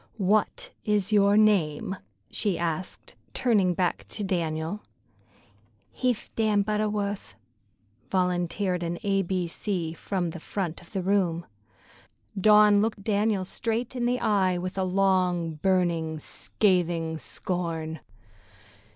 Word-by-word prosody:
"What 205 +1 +1
is 210 -1 +1
your 200 0 +5
name?" 190 -5 +2 0.4
she 205 -5 0
asked, 170 +1 -4 0.2
turning 200 -8 +2
back 180 0 -1
to 210 - -4
Daniel. 165 +1 -2 1.1
"He'th 250 -3 -1
Dan 215 -2 +2
Butterwuth," 210 -1 -2 0.7
volunteered 180 0 0
an 170 0 -2
A 195 -1 +2
B 185 -1 -1
C 170 -1 -2
from 175 0 -2
the 170 - -8
front 175 -1 -4
of 175 - -18
the 190 -3 -2
room. 180 -3 +1 0.9
Dawn 210 +1 +6
looked 215 -2 -1
Daniel 205 -2 +1
straight 230 +5 -3
in 240 -1 0
the 250 +1 +1
eye, 190 -4 +2
with 185 +1 -4
a 190 - 0
long, 180 -4 +1
burning, 170 -4 +1
scathing 170 -1 0
scorn. 165 -5 -4
190 Hz, 115 wpm, -27 LUFS, 175-210 Hz, 1.1 s, Dawn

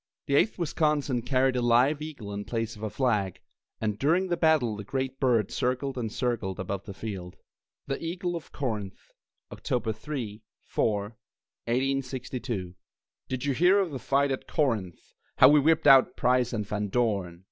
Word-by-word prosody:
The 140 - -2
Eighth 210 +10 +3
Wisconsin 150 -6 0
carried 130 +1 +1
a 125 - +1
live 125 +5 +3
eagle 140 -10 -7
in 100 0 -4
place 115 +1 -3
of 105 - -13
a 110 - -2
flag, 105 -7 0 0.4
and 105 -2 -2
during 175 +6 +2
the 175 - +2
battle 155 -10 +2
the 105 - -7
great 130 +4 -3
bird 120 -7 +2
circled 130 +2 -1
and 115 -4 -3
circled 115 -7 -2
above 95 +1 -4
the 100 - -7
field. 95 -5 -6 0.5
THE 135 +3 -4
EAGLE 175 +1 -3
OF 165 - -8
CORINTH 105 -8 -5 0.4
[October 120 -3 -2
3, 115 -3 -6 0.2
4, 105 -2 0 0.7
1862] 125 -5 -2 0.6
Did 130 +1 -3
you 140 - +1
hear 180 +8 +4
of 190 -5 +1
the 135 - -5
fight 140 +1 +1
at 130 - -4
Corinth, 110 - -2 0.2
How 130 - +8
we 150 +1 +6
whipped 160 +3 +3
out 135 -1 +6
Price 125 -1 +2
and 105 -3 -2
Van 105 +1 -2
Dorn? 100 -6 -1
125 Hz, 170 wpm, -28 LUFS, 105-140 Hz, 0.7 s, How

